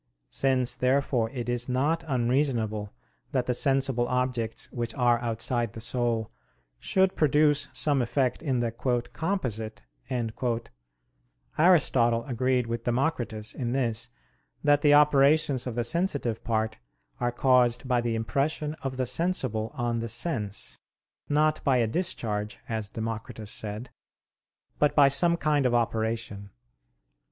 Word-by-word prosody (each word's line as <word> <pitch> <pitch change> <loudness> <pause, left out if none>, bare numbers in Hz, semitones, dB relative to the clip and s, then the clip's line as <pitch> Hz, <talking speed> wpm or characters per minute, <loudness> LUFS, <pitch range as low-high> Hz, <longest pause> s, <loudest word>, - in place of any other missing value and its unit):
Since, 130 - +1
therefore, 125 -2 +1
it 120 -2 -5
is 120 0 -1
not 145 +6 +1
unreasonable 120 -5 0 0.4
that 125 -2 +1
the 125 - 0
sensible 135 -2 +1
objects 125 -3 -1
which 120 -2 -4
are 120 -2 +3
outside 115 0 -2
the 115 - -8
soul 115 -1 -1 0.5
should 190 0 +2
produce 150 -1 +3
some 145 -3 +1
effect 125 +1 0
in 130 -6 0
the 115 -1 -1
"composite," 120 - -2 1.7
Aristotle 125 -9 +3
agreed 130 -1 0
with 115 0 -4
Democritus 120 -4 -1
in 120 -2 -3
this, 120 -5 -1 0.5
that 145 -1 +4
the 145 0 +6
operations 145 -2 +4
of 120 - -4
the 120 - 0
sensitive 140 - -1
part 110 -1 -1 0.4
are 120 - 0
caused 125 0 +2
by 125 -2 +2
the 120 -1 -1
impression 140 +7 -1
of 130 -1 -4
the 130 - 0
sensible 125 - 0
on 120 -1 -1
the 115 0 -4
sense: 115 - -2 0.5
not 155 +1 +2
by 135 -3 +3
a 120 - +3
discharge, 110 - -2
as 110 -3 -3
Democritus 110 -1 -5
said, 105 +3 -5 0.9
but 150 - +3
by 145 -2 +7
some 170 +5 +3
kind 150 -4 +2
of 120 - +1
operation. 110 -3 -1
125 Hz, 130 wpm, -27 LUFS, 115-140 Hz, 1.7 s, by